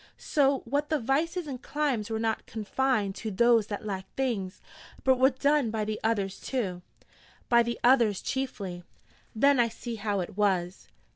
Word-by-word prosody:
'So 275 -2 +1
that 285 +5 -1
the 310 - +2
vices 315 +8 0
and 265 -4 -6
climes 270 -7 -1
were 220 - -1
not 220 0 -2
confined 220 -1 0
to 220 +2 -5
those 230 +1 +3
that 205 0 -5
lacked 190 -2 -4
things, 215 -8 -2 0.4
but 260 -1 +3
were 260 +1 +6
done 280 -1 +1
by 215 -1 -2
the 215 0 -3
others, 200 -4 0
too?' 195 -9 -3 0.7
'By 235 -1 +6
the 235 0 -2
others 235 -6 +4
chiefly.' 200 -10 -3 0.5
'Then 280 +3 +4
I 235 - +4
see 230 0 -6
how 205 -1 -1
it 175 - -6
was!' 190 -3 0
230 Hz, 165 wpm, -28 LUFS, 205-265 Hz, 0.7 s, were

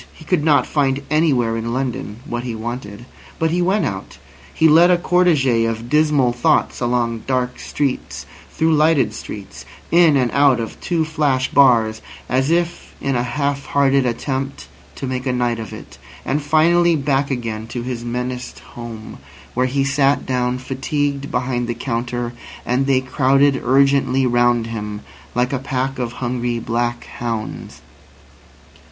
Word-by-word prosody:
He 160 - -14
could 170 -2 +1
not 145 -5 +4
find 140 -2 0
anywhere 135 -8 +2
in 115 +1 -3
London 120 -4 -4
what 120 -5 -3
he 120 -2 -4
wanted. 115 -1 -6 0.3
But 160 0 0
he 175 +1 +1
went 190 +4 +1
out. - - -5 0.3
He 160 - +3
led 165 +3 +6
a 180 - +5
cortege 155 -10 +2
of 115 +2 -6
dismal 150 -5 +3
thoughts 120 - +1
along 120 -2 -1
dark 125 -1 -1
streets, 140 -3 -3 0.2
through 160 0 +1
lighted 150 -5 +3
streets, 100 -2 -8 0.3
in 165 -4 +5
and 125 -3 +1
out 140 -3 +4
of 115 - -6
two 165 -2 0
flash 145 -5 0
bars, 115 -5 +4 0.3
as 130 +3 +1
if 170 +1 -1
in 135 -1 -1
a 120 - +1
half 140 +3 -2
hearted 140 -2 +2
attempt 135 +3 -3 0.3
to - - -5
make 130 0 -3
a - - +2
night 120 -2 0
of 110 -3 -7
it, - - -11 0.3
and 145 +3 0
finally 170 +3 +3
back 140 -1 0
again 115 -4 -4
to 120 0 -5
his 120 -1 -4
menaced 125 +1 -4 0.2
home, 115 -2 -8 0.3
where 125 +1 +1
he 135 +2 0
sat 135 +1 +2
down 125 -1 0
fatigued 140 +2 -2
behind 125 -1 -1
the 120 - -2
counter, 120 0 -3 0.3
and 130 +3 +1
they 130 -1 +3
crowded 135 +1 +2
urgently 135 0 +3
round 120 -1 +2
him, 105 -2 -5 0.3
like 125 +2 +1
a 135 - 0
pack 135 0 -2
of 120 -1 -3
hungry 120 -1 -2
black 120 +1 -2
hounds. 115 -2 -6
130 Hz, 160 wpm, -19 LUFS, 120-140 Hz, 0.3 s, led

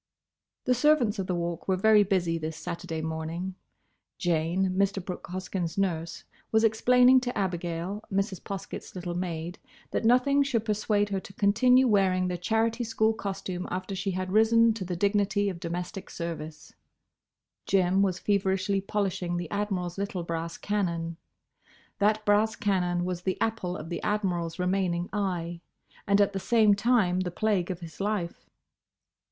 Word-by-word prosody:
The 250 - +4
servants 250 -5 +3
of 190 - -2
the 180 - 0
Walk 170 -1 -3
were 190 - +3
very 215 +2 +6
busy 180 -4 +1
this 155 0 -4
Saturday 165 -1 -5
morning. 160 +3 -4 0.6
Jane, 175 +2 +1
Mr. 195 +1 +1
Brooke 180 - -6
Hoskyn's 180 -1 -4
nurse, 170 -4 -1 0.3
was 220 0 +3
explaining 250 +3 +5
to 250 -1 -4
Abigail, 180 +1 -2
Mrs. 195 -1 -1
Poskett's 195 -1 -7
little 175 -1 -4
maid, 175 0 -4 0.3
that - - -1
nothing 255 +5 +4
should 245 -6 0
persuade 210 -1 +1
her 195 -1 -1
to 195 - -12
continue 250 +7 +4
wearing 190 -4 +3
the 180 - -2
Charity 225 +5 0
School 225 -1 +1
costume 195 -4 -4
after 185 +2 -4
she 195 +1 -2
had 185 0 -3
risen 225 +2 +5
to 215 -3 -5
the 180 -1 -3
dignity 205 +2 +1
of 180 -3 -6
domestic 175 +2 -5
service. 160 -2 -6 0.9
Jim 190 0 +3
was 190 -3 +1
feverishly 195 0 +1
polishing 190 -3 -2
the 175 -2 -5
Admiral's 195 -3 -2
little 200 -3 -3
brass 165 0 -4
cannon. 170 -5 -2 0.8
That 210 +1 +2
brass 210 +2 +3
cannon 180 -3 0
was 180 -1 -3
the 185 0 -2
apple 220 -6 -1
of 155 - -8
the 170 - -4
Admiral's 180 -6 -1
remaining 180 -1 0
eye; 175 -4 -2 0.5
and 200 0 +4
at 200 0 +3
the 195 - -2
same 215 +1 +4
time 200 -4 +2
the 185 -1 -1
plague 195 -1 0
of 180 -1 -4
his 165 -2 -10
life. 200 -4 -3
190 Hz, 155 wpm, -28 LUFS, 175-210 Hz, 0.9 s, very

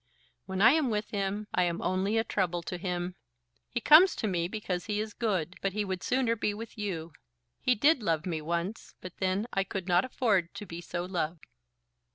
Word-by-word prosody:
When 190 +1 0
I 230 - +9
am 305 -3 +2
with 210 -1 -2
him, 200 +1 -2
I 180 - +2
am 170 0 -1
only 195 +4 0
a 225 - +3
trouble 180 -6 -1
to 180 +1 -5
him. 180 0 -2 0.6
He 240 - -2
comes 320 +9 +7
to - - -3
me, 175 -4 0
because 185 -3 -3
he 210 -1 -1
is 215 0 -3
good; 185 -7 -1
but 195 -1 -1
he 210 0 -1
would 185 -2 -3
sooner 250 -3 +1
be 210 -2 -1
with 225 +2 -8
you. 170 -6 -4 0.5
He 255 -1 +2
did 285 +4 +4
love 165 -4 0
me 165 -4 -2
once; 170 +6 -3
but 185 -1 -10
then 190 +2 0
I 195 - +2
could 190 -1 -5
not 175 0 +4
afford 205 -9 0
to 205 +1 -6
be 170 -2 -7
so 175 0 -4
loved." 170 -3 -3
195 Hz, 210 wpm, -30 LUFS, 175-215 Hz, 0.6 s, I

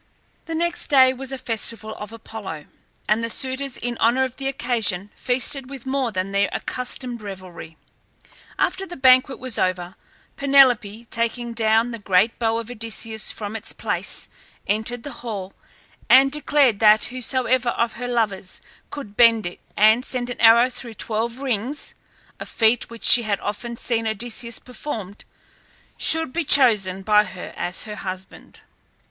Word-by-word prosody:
The 330 - -4
next 345 +1 0
day 260 -3 +5
was 265 +1 -4
a 270 - -4
festival 225 -2 -1
of 210 0 -9
Apollo, 210 -8 -8 0.4
and 215 +2 +1
the 230 - -2
suitors 260 +2 -2
in 240 0 -4
honour 240 +3 +3
of 260 -1 -4
the 270 - -4
occasion 220 -7 -1
feasted 255 +1 -1
with 270 -3 -9
more 265 -2 -1
than 185 0 -3
their 200 0 +1
accustomed 250 -1 -3
revelry. 185 -5 -10 0.8
After 385 +1 0
the 350 - -8
banquet 260 0 +4
was 255 -2 -1
over 180 -1 -1 0.4
Penelope, 250 -6 +3
taking 235 +1 -2
down 225 +1 +2
the 230 - -6
great 200 +2 +1
bow 225 -1 0
of 230 +1 -6
Odysseus 225 -1 -2
from 210 0 -6
its 225 - -3
place, - - -3 0.4
entered 220 +3 -2
the 290 - -7
hall 200 -5 -6 0.6
and 270 +1 +6
declared 290 -6 +2
that 215 -1 +5
whosoever 255 0 0
of 235 -1 -1
her 245 +1 -6
lovers 210 -6 -2 0.3
could 220 -8 -8
bend 230 -3 +5
it 175 - -6 0.2
and 220 +4 +5
send 250 -2 +1
an 245 - -7
arrow 235 +1 +7
through 235 -2 -7
twelve 230 +3 -3
rings 260 +1 -3 0.5
(a - - -7
feat 225 +1 +1
which 230 -1 -11
she 245 - +8
had 210 -3 -1
often 235 +3 -5
seen 230 -2 -1
Odysseus 235 +1 -2
perform) 225 -6 -7 0.8
should 320 -4 +2
be 340 - -1
chosen 210 -10 +4
by 210 +1 +4
her 185 -3 -9
as 175 0 -4
her 210 -1 -8
husband. 185 -1 -8
230 Hz, 155 wpm, -22 LUFS, 210-255 Hz, 0.8 s, she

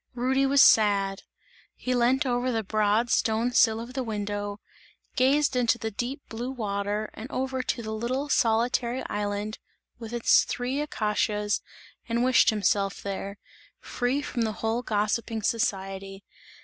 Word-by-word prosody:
Rudy 265 +2 +1
was 280 +1 +6
sad, 200 -5 +4 0.5
he 255 - -2
lent 250 +3 +2
over 250 0 0
the 225 -2 -1
broad 215 +3 +1
stone 225 +2 +1
sill 225 -2 +4
of 235 +2 -8
the 260 - -2
window, 205 -2 -4 0.6
gazed 280 +2 +3
into 240 -2 +2
the 220 -1 -4
deep 250 +7 -4
blue 235 +3 -5
water 210 -3 -3
and 225 +4 -8
over 260 0 -2
to 250 -2 -3
the 220 - -5
little 250 +6 -2
solitary 240 -1 +1
island 205 +1 -3 0.4
with 225 -1 -8
its 240 -1 +4
three 255 +4 -2
acacias 210 -5 -1 0.5
and 235 +1 +1
wished 255 -1 +5
himself 200 -2 0
there, 200 0 -5 0.4
free 255 +4 -2
from 240 - -3
the 220 -1 0
whole 225 +2 0
gossiping 220 0 -1
society. 195 -3 -2
230 Hz, 145 wpm, -27 LUFS, 210-250 Hz, 0.6 s, was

